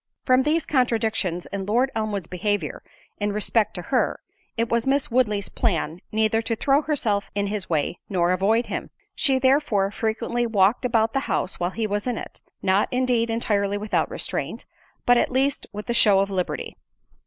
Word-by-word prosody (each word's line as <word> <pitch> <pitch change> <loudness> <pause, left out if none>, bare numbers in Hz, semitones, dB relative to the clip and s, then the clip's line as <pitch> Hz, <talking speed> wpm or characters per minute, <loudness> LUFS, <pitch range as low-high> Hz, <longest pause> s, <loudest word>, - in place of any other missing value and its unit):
From 255 0 +5
these 310 +4 +1
contradictions 220 - 0
in 195 -1 -3
Lord 245 +5 +2
Elmwood's 215 -4 -2
behaviour 180 -2 -2 0.4
in 205 0 0
respect 210 +1 +1
to - - -3
her, - - +2 0.4
it 230 +1 +1
was 235 +1 0
Miss 275 -1 +1
Woodley's 210 -5 +1
plan 170 -7 -1
neither 220 +1 +2
to 230 0 -2
throw 275 +5 +2
herself 230 -10 -1
in 200 0 0
his 200 -1 -3
way, 160 +1 -1
nor 175 -2 +2
avoid 210 +6 +2
him. - - -5 0.2
She 270 -4 +2
therefore 260 -7 +2
frequently 225 +2 -1
walked 210 +2 +2
about 225 -2 +2
the 270 - +2
house 185 - -1
while 175 0 0
he 220 +4 -3
was 205 +2 -2
in 245 -3 -1
it, - - -8 0.2
not 190 +1 +2
indeed 250 -2 +1
entirely 205 -3 0
without 210 +1 0
restraint, - - -3 0.4
but 245 0 +5
at - - +1
least 270 +2 0
with 210 0 -7
the 235 - -1
show 210 -4 +5
of 195 0 0
liberty. 185 -2 -3
220 Hz, 175 wpm, -24 LUFS, 200-245 Hz, 0.4 s, From